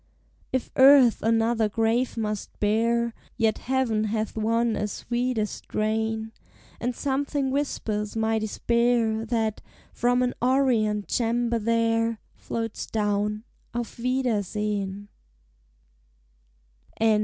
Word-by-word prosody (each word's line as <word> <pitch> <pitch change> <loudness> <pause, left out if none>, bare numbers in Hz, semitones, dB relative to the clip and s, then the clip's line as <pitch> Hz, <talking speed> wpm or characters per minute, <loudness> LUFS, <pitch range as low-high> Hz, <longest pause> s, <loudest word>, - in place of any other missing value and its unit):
If 260 - -2
earth 265 -3 +7
another 225 0 +2
grave 225 +4 0
must 210 -2 -4
bear, 230 +2 +1 0.2
Yet 225 -3 +1
heaven 245 -5 0
hath 215 0 -2
won 225 +1 +1
a 210 - -1
sweeter 240 +1 -1
strain, 220 +1 -2 0.5
And 245 +1 -2
something 280 0 -1
whispers 215 -7 -2
my 220 0 +1
despair, 230 0 +1
That, 220 -2 -1 0.3
from 245 +1 +2
an 250 - 0
orient 240 -5 +2
chamber 235 0 0
there, 230 0 +1 0.2
Floats 225 -1 -4
down, 210 0 -1 0.3
"Auf 240 0 -4
wiedersehen!" 210 -5 -1
225 Hz, 95 wpm, -26 LUFS, 215-240 Hz, 0.5 s, earth